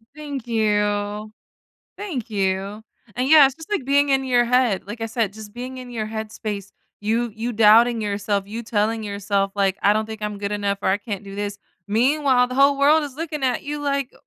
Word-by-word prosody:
Thank 285 -5 -6
you. 210 -1 0 0.7
Thank 300 - -5
you. 195 +1 -2 0.3
And 255 +2 0
yeah, 300 -3 +9
it's 270 - -3
just 320 +4 -12
like 410 -11 -1
being 280 +1 +3
in 270 0 +2
your 245 -2 +3
head, 245 -5 +2
like 210 +3 -7
I 225 - -1
said, 225 -3 -1
just 215 0 -11
being 255 +2 -7
in 250 -1 -9
your 225 -3 -3
head 220 0 -5
space, 205 -3 -5 0.3
you 225 +3 0
you 230 +2 -3
doubting 225 +2 +5
yourself, 205 -1 -1
you 225 +3 -6
telling 220 0 0
yourself 200 -1 -1
like, 195 -1 +1
"I 200 - +5
don't 215 +1 0
think 220 -1 -8
I'm 210 -1 -3
good 200 0 -3
enough 200 -1 -1
or - - +1
I 190 - +3
can't 205 -2 -6
do 195 0 -9
this." 205 0 -4 0.3
Meanwhile, 255 +3 +3
the 255 - -6
whole 275 +1 +4
world 300 +3 +5
is 285 -3 -7
looking 310 -2 -4
at 255 -2 0
you 295 +1 -4
like, 280 -2 -1
225 Hz, 210 wpm, -22 LUFS, 205-260 Hz, 0.7 s, yeah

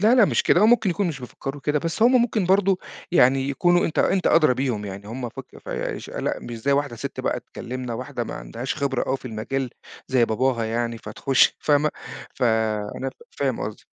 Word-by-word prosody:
لا، 220 +4 +5
لأ 240 -5 +7
مش - - +1
كده 175 - +4
هو 215 - +6
ممكن 225 -4 +4
يكون 195 +2 0
مش 145 -5 -5
بيفكّروا 135 +3 -6
كده، 150 +1 +1
بس 165 +8 -2
هم 245 +1 +6
ممكن 215 -6 0
برضه 190 0 +3 0.3
يعني 135 -4 +4
يكونوا 175 +6 +3
أنت 160 - -3
أنت 190 - +2
أدرى 155 -6 +5
بيهم 125 -5 -1
يعني، 100 0 -7
هم 120 +1 -4
فك - - -11
فا - - -4
اش - - -9
لأ - - -2
مش 120 - -7
زي 140 +5 +1
واحدة 140 -4 0
ست - - -5
بقى - - -1
تكلمنا، 125 -1 -6
واحدة 125 0 -4
ما - - -6
عندهاش 120 +3 -5
خبرة 140 -3 -1
أوي 135 - +1
في - - -22
المجال، 125 +3 -3 0.4
زي 125 -3 +4
باباها 120 +1 0
يعني 115 +1 -2
فتخُش 120 +5 +2
فاهمة، 150 0 +3 0.4
ف - - -7 0.5
أنا 135 0 -3
ف - - -20 0.2
فاهم 135 -3 0
قصدِك. 105 - -6
135 Hz, 210 wpm, -24 LUFS, 120-165 Hz, 0.5 s, لأ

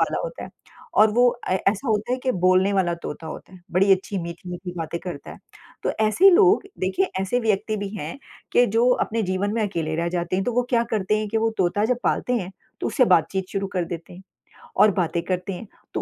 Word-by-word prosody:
पाला - - +1
होता - - -6
है - - -11 0.4
और 215 0 +6
वो 245 +3 +4
अ, 240 -6 -5
ऐसा 200 +6 0
होता 220 +3 0
है 255 - 0
कि 255 - +2
बोलने 185 +2 +4
वाला 185 -3 +1
तोता 155 +2 -6
होता 160 - -9
है। 180 - -14
बड़ी 195 +2 +4
अच्छी 190 +1 -1
मीठी-मीठी 175 +1 -7
बातें 165 +1 -3
करता 175 -6 -7
है। - - -11 0.4
तो - - 0
ऐसे 220 - +6
लोग 390 +2 +5 0.2
देखिए, 190 - 0
ऐसे 195 +6 0
व्यक्ति 215 -1 0
भी 200 -1 -4
हैं 165 - -6 0.3
कि 245 - +5
जो 230 +4 +2 0.2
अपने 225 0 -2
जीवन 190 +2 -1
में 225 - 0
अकेले 165 -6 -2
रह 170 +1 0
जाते 175 +1 -2
हैं, 195 - 0
तो 245 - -1
वो 245 +1 +2
क्या 235 -2 +3
करते 215 0 +1
हैं 215 -1 -3
कि 225 - -2
वो 225 0 +1
तोता 190 +3 +1
जब 245 +1 +1
पालते 250 - 0
हैं, 190 -5 -3 0.3
तो - - -1
उससे 255 - +3
बातचीत 185 0 +2
शुरू 195 -1 -1
कर 180 -2 0
देते 170 0 -7
हैं 185 +2 -12 0.6
और 210 +1 +6
बातें 170 -2 0
करते 185 +1 -2
हैं, 190 +4 -8 0.3
तो - - -1
195 Hz, 230 wpm, -23 LUFS, 180-225 Hz, 0.6 s, और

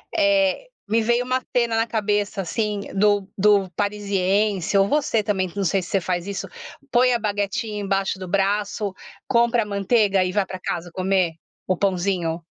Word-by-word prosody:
Eh, 300 - +2 0.2
me 225 +2 +2
veio 240 +2 +2
uma 255 +1 0
tena 235 -2 +2
na 225 +1 +1
cabeça 205 -3 -1
assim 210 +2 -2
do 205 0 +2
do 200 -1 +4
parisiense 200 -1 0
ou 195 0 +4
você 235 -6 +1
também 190 -3 -1
que 170 - -18
não 200 - 0
sei 190 +1 +1
se 175 - -9
você 195 - +1
faz 180 0 -2
isso, 195 -1 -4 0.4
põe 250 +1 +4
a 240 - +2
baguetinha 205 0 -2
embaixo 195 -1 -1
do 185 - -6
braço, 200 +1 0 0.3
compra 235 0 +3
a - - -9
manteiga 200 -1 +2
e 180 - -1
vai 200 0 +1
pra 185 0 -7
casa 175 -1 -4
comer 185 -2 +1 0.3
o 185 - +2
pãozinho. 180 -3 -1
200 Hz, 175 wpm, -23 LUFS, 190-220 Hz, 0.4 s, do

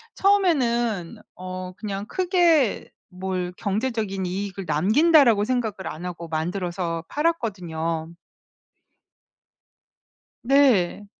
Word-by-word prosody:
처음에는 240 - +1 0.2
어 185 0 -6
그냥 200 0 -5
크게 345 - +2 0.2
뭘 185 -1 -4
'경제적인 210 -2 -2
이익을 195 +1 -4
남긴다.'라고 220 - +4
생각을 220 -6 -2
안 170 +4 -8
하고 170 -1 -6
만들어서 170 +1 -3
팔았거든요. 175 - -2 2.3
네. 240 -8 +3
200 Hz, 205 characters per minute, -24 LUFS, 180-250 Hz, 2.3 s, 남긴다.'라고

